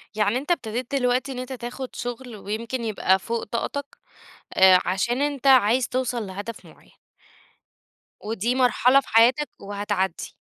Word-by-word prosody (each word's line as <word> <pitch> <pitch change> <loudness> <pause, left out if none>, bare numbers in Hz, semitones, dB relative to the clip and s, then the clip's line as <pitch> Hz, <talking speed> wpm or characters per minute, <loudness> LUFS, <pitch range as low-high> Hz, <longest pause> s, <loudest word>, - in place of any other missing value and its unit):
يعني 210 +3 +1
أنت 290 +6 -3
ابتديت 250 -2 -2
دلوقتي 255 +1 +1
إن 250 - -5
أنت 255 +1 -6
تاخُد 250 +1 -7
شُغل 245 -1 -6
ويمكن 225 +5 -4
يبقى 195 -4 +2
فوق 230 +4 -3
طاقتك، 280 +5 -4 0.6
آآ 185 -1 +7
عشان 215 +8 0
أنت 285 -2 -1
عايز 250 -1 +5
توصل 245 -4 -2
لهدف 205 +4 -7
معيّن. - - -19 1.3
ودي 225 +3 -1
مرحلة 255 +1 +4
في - - -20
حياتك 240 +6 +4
وهتعدّي. 200 -2 -3
240 Hz, 140 wpm, -24 LUFS, 210-260 Hz, 1.3 s, آآ